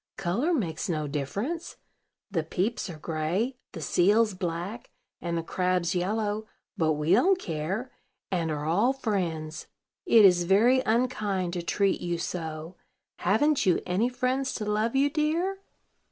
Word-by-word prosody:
"Color 220 Hz, -, 0 dB
makes 185 Hz, -, -1 dB
no 155 Hz, -3 st, -1 dB
difference; 200 Hz, -, -3 dB, 0.6 s
the 170 Hz, -5 st, +1 dB
peeps 190 Hz, +8 st, -2 dB
are 165 Hz, -, -7 dB
gray, 170 Hz, -, -2 dB, 0.2 s
the 165 Hz, -, -6 dB
seals 205 Hz, +8 st, +3 dB
black, 180 Hz, +5 st, -4 dB, 0.3 s
and 170 Hz, -1 st, -2 dB
the 165 Hz, -, -2 dB
crabs 180 Hz, 0 st, 0 dB
yellow; 210 Hz, +3 st, -1 dB, 0.3 s
but 160 Hz, -1 st, +2 dB
we 150 Hz, +2 st, -1 dB
don't 355 Hz, -, +5 dB
care, 185 Hz, -, -3 dB, 0.4 s
and 170 Hz, -3 st, 0 dB
are 150 Hz, -1 st, -3 dB
all 205 Hz, +11 st, +3 dB
friends. 175 Hz, -11 st, -3 dB, 0.4 s
It 225 Hz, -9 st, +7 dB
is 175 Hz, -2 st, +5 dB
very 225 Hz, +8 st, +5 dB
unkind 215 Hz, -6 st, 0 dB
to 175 Hz, -, -2 dB
treat 195 Hz, +3 st, +1 dB
you 175 Hz, -1 st, -1 dB
so. 165 Hz, 0 st, -5 dB, 0.4 s
Haven't 235 Hz, +6 st, +2 dB
you 180 Hz, -, +4 dB
any 195 Hz, +7 st, +1 dB
friends 255 Hz, +1 st, -1 dB
to 210 Hz, -, -3 dB
love 215 Hz, +3 st, 0 dB
you, 275 Hz, +1 st, +4 dB
dear?" 320 Hz, +6 st, 0 dB
190 Hz, 145 wpm, -27 LUFS, 170-235 Hz, 0.6 s, It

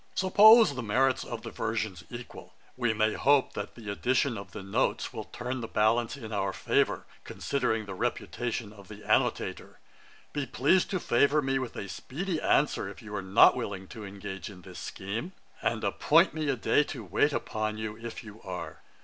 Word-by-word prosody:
'Suppose 215 Hz, +1 st, +7 dB
the 130 Hz, -, -4 dB
merit 130 Hz, +4 st, +2 dB
of 115 Hz, -2 st, -6 dB
the -, -, -6 dB
versions 110 Hz, -5 st, -3 dB
equal, 120 Hz, 0 st, -10 dB, 0.2 s
we 120 Hz, -3 st, +1 dB
may 110 Hz, 0 st, +1 dB
hope 140 Hz, 0 st, +3 dB
that 100 Hz, -, -6 dB
the 110 Hz, -4 st, -6 dB
addition 125 Hz, +4 st, +1 dB
of 100 Hz, -1 st, -8 dB
the 100 Hz, -, -7 dB
Notes 95 Hz, -, -1 dB
will -, -, -5 dB
turn 125 Hz, +1 st, -5 dB
the 115 Hz, -, -4 dB
balance 115 Hz, +4 st, +1 dB
in 115 Hz, -5 st, -8 dB
our 100 Hz, -1 st, 0 dB
favour, -, -, +1 dB, 0.2 s
considering 125 Hz, -6 st, -1 dB
the 100 Hz, -, -6 dB
reputation 115 Hz, +3 st, -3 dB
of 100 Hz, -2 st, -14 dB
the 105 Hz, +1 st, -11 dB
Annotator. -, -, 0 dB, 0.6 s
'Be 145 Hz, -3 st, -2 dB
pleased 145 Hz, +11 st, +2 dB
to 185 Hz, -, -1 dB
favour 145 Hz, +1 st, +3 dB
me 135 Hz, -2 st, 0 dB
with 130 Hz, -3 st, -5 dB
a 100 Hz, -, -5 dB
speedy 165 Hz, -, -4 dB
answer, 150 Hz, -, +2 dB
if -, -, -11 dB
you 105 Hz, -1 st, -9 dB
are 100 Hz, -, -2 dB
not 95 Hz, +1 st, +6 dB
willing 95 Hz, -2 st, -4 dB
to 110 Hz, -3 st, -8 dB
engage 95 Hz, -2 st, -7 dB
in 90 Hz, -3 st, -13 dB
this -, -, -10 dB
scheme; 115 Hz, -, -5 dB, 0.3 s
and -, -, -1 dB
appoint -, -, +4 dB
me 155 Hz, -2 st, -2 dB
a 135 Hz, -, +2 dB
day 130 Hz, +4 st, +3 dB
to 130 Hz, -6 st, -6 dB
wait 105 Hz, -, +2 dB
upon 110 Hz, -5 st, -2 dB
you, 110 Hz, -1 st, -4 dB
if 115 Hz, +2 st, -8 dB
you 105 Hz, 0 st, -12 dB
are. 90 Hz, -2 st, -7 dB
115 Hz, 190 wpm, -29 LUFS, 105-135 Hz, 0.6 s, Suppose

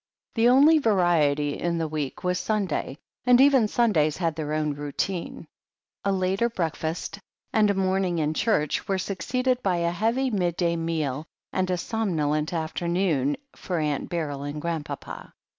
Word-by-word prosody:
The 230 Hz, +1 st, +4 dB
only 290 Hz, +5 st, +6 dB
variety 165 Hz, -, +2 dB
in 170 Hz, -1 st, -1 dB
the 165 Hz, -1 st, -1 dB
week 150 Hz, 0 st, -4 dB
was 180 Hz, 0 st, 0 dB
Sunday, 195 Hz, -10 st, -1 dB, 0.3 s
and 250 Hz, 0 st, +5 dB
even 265 Hz, -5 st, +6 dB
Sundays 175 Hz, -11 st, +2 dB
had 165 Hz, -4 st, -1 dB
their 150 Hz, -1 st, -4 dB
own 155 Hz, -1 st, 0 dB
routine. 145 Hz, +5 st, -4 dB, 0.6 s
A 200 Hz, -, +1 dB
later 190 Hz, +4 st, +1 dB
breakfast 165 Hz, -2 st, -3 dB, 0.3 s
and 215 Hz, -2 st, +4 dB
a 200 Hz, -, +2 dB
morning 190 Hz, -2 st, +1 dB
in 155 Hz, -1 st, 0 dB
church 155 Hz, -5 st, 0 dB
were 195 Hz, -, +1 dB
succeeded 250 Hz, +8 st, -1 dB
by 190 Hz, -5 st, +1 dB
a 170 Hz, 0 st, +1 dB
heavy 230 Hz, +8 st, 0 dB
midday 175 Hz, -3 st, 0 dB
meal 160 Hz, -3 st, -2 dB, 0.3 s
and 185 Hz, -1 st, 0 dB
a 180 Hz, -, +1 dB
somnolent 160 Hz, -8 st, -1 dB
afternoon 165 Hz, -3 st, 0 dB, 0.2 s
for 180 Hz, -, -3 dB
Aunt 150 Hz, -3 st, -1 dB
Beryl 150 Hz, -5 st, -3 dB
and 145 Hz, +1 st, -4 dB
Grandpapa. 150 Hz, -3 st, -5 dB
175 Hz, 150 wpm, -26 LUFS, 155-200 Hz, 0.6 s, only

